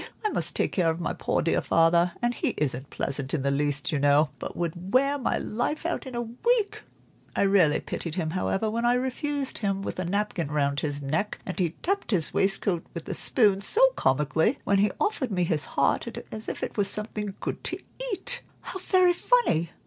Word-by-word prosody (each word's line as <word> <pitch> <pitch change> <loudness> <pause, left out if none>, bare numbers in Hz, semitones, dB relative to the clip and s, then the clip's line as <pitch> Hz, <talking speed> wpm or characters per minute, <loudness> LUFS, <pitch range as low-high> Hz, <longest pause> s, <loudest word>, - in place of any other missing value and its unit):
I - - +3
must - - -1
take - - +1
care 175 -4 +2
of 160 +1 -2
my 170 - -2
poor - - -1
dear - - +2
father, 170 +1 +3
and 240 0 +2
he - - -2
isn't 135 -2 -1
pleasant 140 +1 -3
in 140 - -2
the 140 - +1
least, 145 +2 0
you 150 - 0
know, 145 +1 +4
but - - -6
would 175 +2 -3
wear 275 +4 +3
my 250 - 0
life 270 +9 -2
out 340 -5 -2
in 255 - -7
a 240 - -1
week. 415 - 0 0.5
I - - +2
really 195 -7 +4
pitied 165 -2 -5
him, 165 -4 -1
however, 190 +4 0
when 230 +2 -1
I 240 +1 +4
refused 270 +2 -1
him, 195 -2 -1
with - - -4
a 185 - -1
napkin 190 -4 -1
round 140 -1 +1
his 145 -1 -3
neck, 160 +9 -1
and 185 - -5
he 170 -3 0
tapped 395 +3 -1
his 180 -8 0
waistcoat 195 -3 +1
with 170 - -6
a - - -1
spoon 205 -5 +2
so - - +5
comically, 150 - +1
when 200 -1 +2
he 205 +1 +4
offered 410 - 0
me 180 -4 0
his 160 -3 0
heart, 140 +10 +1 0.2
as 215 0 -4
if - - -5
it - - -4
were 205 - +4
something 210 0 -2
good - - -4
to - - -2 0.3
eat." 485 +4 +1 0.2
"How 375 - -6
very 370 -1 +4
funny! 350 - +2
195 Hz, 210 wpm, -27 LUFS, 160-245 Hz, 0.5 s, so